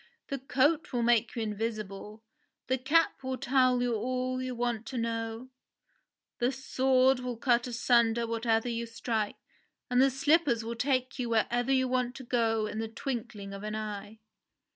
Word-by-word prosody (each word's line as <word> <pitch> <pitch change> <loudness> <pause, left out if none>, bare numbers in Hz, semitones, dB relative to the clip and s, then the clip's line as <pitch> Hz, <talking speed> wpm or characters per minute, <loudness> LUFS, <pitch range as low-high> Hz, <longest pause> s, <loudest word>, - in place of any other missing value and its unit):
The 275 - -2
coat 290 +6 +1
will 240 -2 0
make 235 0 +2
you 230 - -1
invisible, 215 -1 -5 0.4
the 260 +1 0
cap 295 +4 +2
will 260 -1 -3
tell 255 -1 +3
you 245 -1 0
all 255 +3 -1
you 255 -1 -4
want 235 -1 -2
to 260 - -5
know, 230 +1 -3 0.9
the 245 +2 +2
sword 265 0 +2
will 250 -2 -4
cut 240 0 +2
asunder 235 -1 +2
whatever 230 0 0
you 235 -1 -2
strike, 225 -2 -2 0.5
and 250 +1 +4
the 270 - +6
slippers 275 -2 +2
will 230 +1 -4
take 255 +1 0
you 240 -2 -1
wherever 240 +3 +1
you 260 -1 +3
want 250 0 0
to 265 - -8
go 225 -3 +1
in 215 +1 -4
the 225 - -2
twinkling 225 -4 -5
of 195 - -7
an 215 +1 -4
eye 210 0 -5
240 Hz, 165 wpm, -30 LUFS, 225-255 Hz, 0.9 s, the